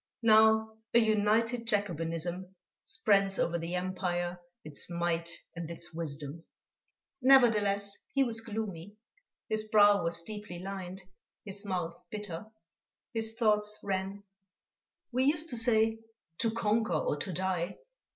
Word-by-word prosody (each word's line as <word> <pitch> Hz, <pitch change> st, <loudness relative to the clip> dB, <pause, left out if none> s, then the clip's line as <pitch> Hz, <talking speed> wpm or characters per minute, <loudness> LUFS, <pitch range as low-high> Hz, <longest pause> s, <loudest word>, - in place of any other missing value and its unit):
Now 220 Hz, 0 st, +5 dB, 0.2 s
a -, -, +9 dB
united 225 Hz, +2 st, +2 dB
Jacobinism 180 Hz, -2 st, -2 dB, 0.3 s
spreads 195 Hz, -2 st, +2 dB
over 170 Hz, 0 st, 0 dB
the 165 Hz, +2 st, -3 dB
empire 180 Hz, -1 st, -2 dB, 0.2 s
its 150 Hz, +1 st, -4 dB
might 170 Hz, -1 st, -1 dB, 0.3 s
and 165 Hz, -1 st, -5 dB
its 170 Hz, 0 st, -2 dB
wisdom...." 155 Hz, -1 st, -5 dB, 0.8 s
Nevertheless, 210 Hz, -6 st, +4 dB, 0.2 s
he 275 Hz, -, +5 dB
was 230 Hz, -3 st, -1 dB
gloomy. 205 Hz, -4 st, -5 dB, 0.5 s
His 215 Hz, 0 st, 0 dB
brow 205 Hz, -2 st, +6 dB
was 170 Hz, 0 st, -1 dB
deeply 210 Hz, -2 st, -7 dB
lined, 190 Hz, 0 st, -6 dB, 0.4 s
his 200 Hz, 0 st, -6 dB
mouth 175 Hz, -4 st, -2 dB
bitter. 205 Hz, -2 st, -5 dB, 0.7 s
His 225 Hz, -1 st, -1 dB
thoughts 210 Hz, -2 st, +2 dB
ran: 195 Hz, +1 st, -3 dB, 0.9 s
"We 255 Hz, +2 st, +2 dB
used 310 Hz, +3 st, +2 dB
to 245 Hz, -, -1 dB
say: 225 Hz, -1 st, +3 dB, 0.4 s
_To 230 Hz, -1 st, +2 dB
conquer 220 Hz, -3 st, +1 dB
or 155 Hz, -1 st, 0 dB
to 185 Hz, -, -3 dB
die. 180 Hz, 0 st, -2 dB
200 Hz, 120 wpm, -31 LUFS, 175-220 Hz, 0.9 s, a